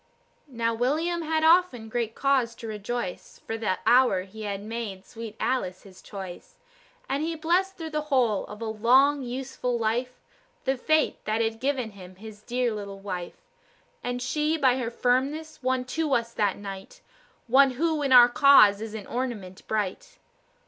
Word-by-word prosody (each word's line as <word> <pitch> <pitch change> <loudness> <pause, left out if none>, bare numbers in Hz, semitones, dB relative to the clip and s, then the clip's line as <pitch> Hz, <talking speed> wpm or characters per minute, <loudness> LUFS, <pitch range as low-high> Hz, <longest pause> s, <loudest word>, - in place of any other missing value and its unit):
Now, 230 -4 -1
William 310 +9 0
had 315 0 0
often 320 -9 +4
great 225 0 -3
cause 260 -4 +1
to 230 - -10
rejoice 215 -2 -5
For 225 - -3
the 215 -5 -1
hour 240 -6 +4
he 205 +3 -11
had 200 -1 -4
made 215 -4 -6
sweet 225 0 -9
Alice 185 -8 -2
his 190 -2 -15
choice; 190 - -9 0.5
And 275 +2 -1
he 325 +1 -2
blessed 360 +5 0
through 325 -2 -6
the 305 0 -1
whole 240 -7 +2
of 210 +2 -8
a - - -3
long, 255 +6 +3
useful 250 -1 -3
life, 240 +3 -2 0.5
The 265 0 +1
fate 310 +4 +1
that 215 +1 0
had 225 0 -1
given 260 -4 -1
him 185 -2 -13
his 210 +1 -11
dear 245 +1 -1
little 200 -2 -6
wife. 185 -3 -6 0.7
And 245 0 -3
she, 300 +5 0
by 260 -4 +3
her 235 -2 -2
firmness, 270 +6 -1
won 255 0 0
to 315 -4 +1
us 235 0 -2
that 205 -4 0
night 195 -1 -9 0.4
One 270 +3 +5
who 315 +3 0
in 275 -2 -1
our 245 -1 +9
cause 245 -6 +6
is 220 -1 -6
an 210 -3 -7
ornament 225 -7 -5
bright. 220 - -3
240 Hz, 170 wpm, -26 LUFS, 215-275 Hz, 0.7 s, our